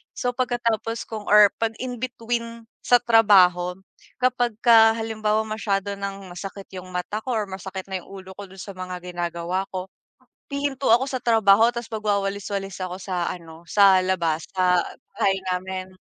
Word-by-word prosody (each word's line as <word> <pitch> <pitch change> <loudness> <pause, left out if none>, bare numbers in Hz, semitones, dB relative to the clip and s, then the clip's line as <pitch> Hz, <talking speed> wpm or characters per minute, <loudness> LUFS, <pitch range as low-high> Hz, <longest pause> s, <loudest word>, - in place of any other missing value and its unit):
so 250 - -1
pagkatapos 235 -2 -1
kong 215 -2 -6
or 210 -1 +7
'pag 225 0 0
in 250 -1 -4
between 230 -1 -4 0.2
sa 245 -1 +5
trabaho 190 -6 +5 0.5
kapagka 235 -2 +4
halimbawa 220 -1 -1
masyado 200 -2 -2
ng 195 -1 -6
masakit 195 +2 -8
'yung 185 - -8
mata 180 +4 -3
ko 255 - -1
or 210 -3 -1
masakit 190 0 -6
na 190 - -2
'yung 180 - -11 0.2
ulo 185 - -14
ko 200 - -7
do'n 190 0 -12
sa 200 -2 -9
mga 185 -1 -6
ginagawa 175 +1 -3
ko, 185 0 -4 0.6
hihinto 280 -2 -1
ako 245 +4 +4
sa 260 -2 -4
trabaho, 225 0 +5
tapos 235 -1 -6
magwawalis-walis 200 -2 -2
ako 185 +1 -5
sa 180 -2 -2
ano, 165 -2 -11
sa 190 +1 +5
labas, 170 -4 0
sa 180 -1 +2 0.3
bahay 195 -1 +1
namin. 185 0 -3
200 Hz, 155 wpm, -23 LUFS, 185-225 Hz, 0.6 s, or